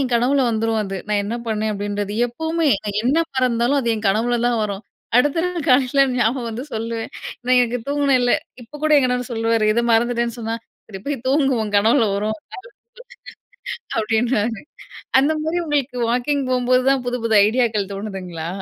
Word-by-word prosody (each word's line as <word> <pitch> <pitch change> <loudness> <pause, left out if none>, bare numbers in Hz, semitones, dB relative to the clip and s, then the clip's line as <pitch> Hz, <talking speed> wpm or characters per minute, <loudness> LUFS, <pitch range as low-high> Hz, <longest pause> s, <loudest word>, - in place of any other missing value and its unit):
என் 255 -3 -1
கனவுல 260 +4 +2
வந்துரும் 225 0 0
அது. 195 -1 -4
நான் 205 -1 +1
என்ன 220 +3 -3
பண்ணேன் 215 -1 -1
அப்படின்றது. 205 0 -3
எப்பவுமே 320 +6 -1 0.2
நான் 205 0 -2
என்ன 265 +5 +2 0.2
மறந்தாலும் 250 +2 +2
அது 235 - -2
என் 215 -1 -3
கனவுலதான் 240 +3 +1
வரும். 200 0 -3 0.3
அடுத்த 290 +6 +3
நாள் 350 -4 -4
காலைல 260 +1 +4 0.2
ஞாபகம் 240 +1 0
வந்து 230 +3 -5
சொல்லுவேன். 225 0 -4 0.4
"நான் 255 0 +5
எங்க 240 +1 -2
தூங்கினேன்ல" 275 -4 +2 0.3
இப்ப 290 +6 -12
கூட 310 - +3
என் 270 - +2
கணவரு 250 0 -2
சொல்லுவாரு. 225 -1 +1
எதோ 235 +2 +1
மறந்துட்டேன்னு 235 +1 +1
சொன்னா, 225 0 -3 0.3
"சரி 195 -3 -9
போய் 275 -4 -3
தூங்கு, 275 0 +2
உன் 210 -1 -6
கனவுல 225 +2 +3
வரும்." 215 +2 -2 1.6
அப்படின்னுவாரு. 225 0 0 0.6
அந்த 295 +3 +2
மாதிரி, 320 +3 -1
உங்களுக்கு 285 -4 -1
வாக்கிங் 265 +3 0
போகும்போது 255 0 +2
தான் 270 -2 +1
புது, 245 0 -1
புது 225 -1 +1
ஐடியாக்கள் 220 -4 0
தோணுதுங்களா? 185 -5 -6
235 Hz, 160 wpm, -20 LUFS, 220-260 Hz, 1.6 s, நான்